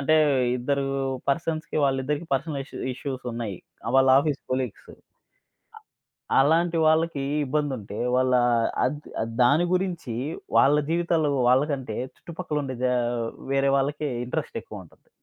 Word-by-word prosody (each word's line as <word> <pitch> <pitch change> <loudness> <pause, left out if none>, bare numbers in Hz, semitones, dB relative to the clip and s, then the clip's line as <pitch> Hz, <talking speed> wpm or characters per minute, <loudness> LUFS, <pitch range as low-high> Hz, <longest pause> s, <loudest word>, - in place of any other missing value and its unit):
అంటే 155 +3 +3 0.4
ఇద్దరు 140 +2 0 0.4
పర్సన్స్‌కి 160 +2 -1
వాళ్ళిద్దరికీ 140 +4 -1
పర్సనల్ 140 +1 -2
ఇష్యూ - - -10 0.2
ఇష్యూసున్నాయి. 120 -7 -5 0.3
ఆ! - - -1
వాళ్ళు 135 0 +5
ఆఫీస్ 145 0 0
కొలీగ్సు. 130 -4 -3 1.4
ఆహ్, - - +5
అలాంటి 165 +4 +2
వాళ్ళకి 160 -2 +2 0.2
ఇబ్బందుంటే 130 -7 -2 0.2
వాళ్ళ 130 0 +2 0.5
అద్ 145 +3 -2 0.2
అద్ 115 0 -6
దాని 145 +8 +4
గురించి 175 -10 -2 0.4
వాళ్ళ 145 +2 +5
జీవితాలేవో 165 -4 +1
వాళ్ళకంటే 130 -4 +1 0.2
చుట్టుపక్కలుండే 150 -6 -4
జా 125 - +2 0.6
వేరే 135 0 +3
వాళ్ళకి 145 +2 -1 0.2
ఇంట్రెస్ట్ 125 - -4
ఎక్కువుంటది. - - -13
140 Hz, 115 wpm, -25 LUFS, 130-155 Hz, 1.4 s, వాళ్ళు